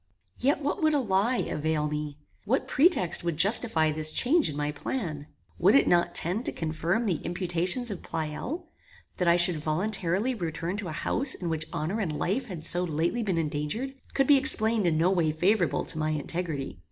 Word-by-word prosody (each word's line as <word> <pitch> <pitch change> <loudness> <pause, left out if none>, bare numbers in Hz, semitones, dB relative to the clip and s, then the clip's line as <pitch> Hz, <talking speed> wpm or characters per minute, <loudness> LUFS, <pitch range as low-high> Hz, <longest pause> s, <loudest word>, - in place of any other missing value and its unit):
Yet 280 +3 0
what 295 +7 -2
would 310 -1 +2
a - - +2
lie 220 +1 0
avail 150 0 -1
me? 150 -1 -5 0.3
What 260 +6 0
pretext 275 - +3
would 170 -3 -2
justify 185 -4 +2
this 155 0 0
change 305 - +3
in 145 - -6
my 150 0 -2
plan? 150 - -5 0.3
Would 190 +7 +4
it 275 - +4
not 175 0 +2
tend 185 +8 +1
to - - +3
confirm 165 +7 -2
the 180 -7 0
imputations 180 +6 -1
of 195 - -6
Pleyel? 165 - -5 0.5
That 180 - -1
I 170 - +5
should 175 -1 +3
voluntarily 185 +7 0
return 170 -3 -4
to 205 -3 -5
an 155 - -6
house 260 - +2
in 175 - -5
which 155 -1 -1
honor 175 +9 -3
and 160 -8 -3
life 250 +8 -2
had 170 -6 -4
so 175 +1 +4
lately 170 +7 -1
been 195 -6 -1
endangered, 160 - -3 0.2
could 275 - +2
be 285 +1 +6
explained 225 -7 +4
in 160 -2 +1
no 170 +4 +2
way 170 -5 +1
favorable 185 +8 0
to 160 - -1
my 155 0 -1
integrity. 150 - -4
175 Hz, 190 wpm, -27 LUFS, 155-225 Hz, 0.5 s, be